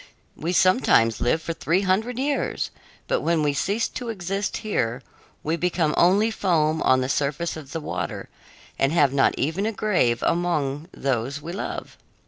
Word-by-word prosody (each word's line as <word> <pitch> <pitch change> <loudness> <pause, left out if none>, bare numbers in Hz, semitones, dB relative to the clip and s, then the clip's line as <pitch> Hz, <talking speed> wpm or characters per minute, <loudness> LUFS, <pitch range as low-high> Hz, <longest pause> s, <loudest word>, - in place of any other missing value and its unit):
We 165 +3 -3
sometimes 175 - +3
live 160 +6 +1
for 165 - -3
three 170 +3 0
hundred 215 +6 0
years, 280 +2 -1 0.4
but - - +1
when 165 -2 +1
we 145 -1 +2
cease 200 +10 0
to 245 -2 -6
exist 195 -1 -2
here, 125 - -1 0.4
we 160 +2 0
become 170 -3 +1
only 200 +6 +4
foam 160 -6 +1
on 130 0 +4
the 130 - -1
surface 145 +5 -1
of 145 -4 -10
the 165 - -3
water 90 - -4 0.5
and 135 - +3
have 145 -5 +3
not 135 -1 +3
even 175 +8 0
a - - 0
grave 180 - +1
among 155 -4 0
those 135 +1 -2
we 165 +4 -7
love. 195 - -5
165 Hz, 165 wpm, -24 LUFS, 140-190 Hz, 0.5 s, only